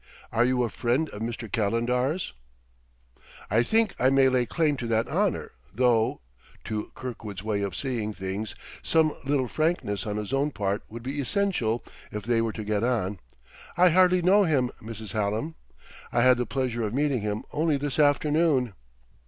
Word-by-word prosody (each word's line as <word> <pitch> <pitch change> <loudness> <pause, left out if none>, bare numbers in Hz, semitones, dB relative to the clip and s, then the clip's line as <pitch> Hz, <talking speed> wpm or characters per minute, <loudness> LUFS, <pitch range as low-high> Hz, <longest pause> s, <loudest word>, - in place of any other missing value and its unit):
Are 115 +1 +3
you 125 0 +2
a 120 - 0
friend 130 +6 0
of 105 - -8
Mr. 115 0 -4
Calendar's?" 125 - 0 1.2
"I 110 +3 +4
think 220 - +2
I 130 - +4
may 135 0 +5
lay 125 -2 +1
claim 155 +2 +1
to 120 - -4
that 115 0 +1
honor, - - 0 0.2
though" 120 -2 +2 0.4
to 110 -1 -4
Kirkwood's 115 -8 -6
way 105 -2 -1
of 100 -1 -3
seeing 120 -6 -2
things 100 +1 -5 0.3
some 160 -1 +3
little 135 -2 +1
frankness 155 - -1
on 105 0 -2
his 105 +4 -4
own 140 +2 +2
part 100 -6 -2
would 115 +1 -8
be 140 +3 -3
essential 130 - 0 0.3
if 105 -1 -5
they 115 -1 +2
were 115 -1 -1
to 110 - -5
get 105 0 -1
on 105 -6 0 0.6
"I 180 +1 +7
hardly 180 +1 +4
know 195 +4 +6
him, 140 -8 +2
Mrs. 110 -1 -8
Hallam. 110 +8 -1 0.6
I 120 - +3
had 130 -1 +6
the 125 - -1
pleasure 125 -3 -1
of 110 +1 -2
meeting 140 -4 +1
him 105 0 -2
only 155 -1 +2
this 145 0 -3
afternoon." 145 -4 +3
125 Hz, 170 wpm, -27 LUFS, 110-145 Hz, 1.2 s, I